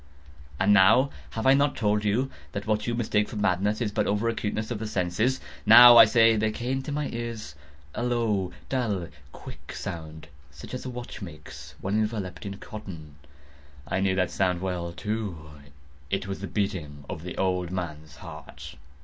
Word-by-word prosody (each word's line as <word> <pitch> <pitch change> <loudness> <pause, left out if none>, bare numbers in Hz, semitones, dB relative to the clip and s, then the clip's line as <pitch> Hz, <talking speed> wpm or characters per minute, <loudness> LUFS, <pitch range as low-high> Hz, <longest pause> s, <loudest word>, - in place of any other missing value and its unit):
And 105 +2 +5
have 115 +3 +2
I 135 - +7
not 140 0 +2
told 105 -4 +1
you 115 +6 0 0.2
that 100 - -4
what 105 0 0
you 120 - 0
mistake 105 -3 0
for - - -8
madness 105 +2 +1
is 110 -3 0
but - - 0
over 105 +3 0
acuteness 110 0 -3
of 115 - -3
the 110 - -4
sense?—now, 120 +5 +5
I 115 -1 +11
say, 115 +1 +5
there 110 0 +1
came 125 +4 -2
to 145 - -6
my 150 0 -1
ears 115 -8 -5 0.4
a - - -4
low, 115 -6 0 0.2
dull, 105 -10 -1 0.2
quick - - -11
sound, 80 -2 -7 0.2
such 70 - -11
as 125 - -5
a - - -3
watch 125 -2 -8
makes 85 -6 -10
when 100 +3 0
enveloped 105 -4 -3
in 100 0 -6
cotton. 80 -10 -9 0.7
I 95 - -1
knew 95 -1 +1
that 95 -2 0
sound 90 -2 +1
well, 90 -2 -3
too. 90 -4 -4 0.6
It 95 - -1
was 95 -1 -5
the 100 - -5
beating 80 -7 -3
of 80 - -6
the 90 +1 -7
old 90 -2 0
man's 80 -4 -6
heart. - - -10
105 Hz, 175 wpm, -26 LUFS, 90-115 Hz, 0.7 s, I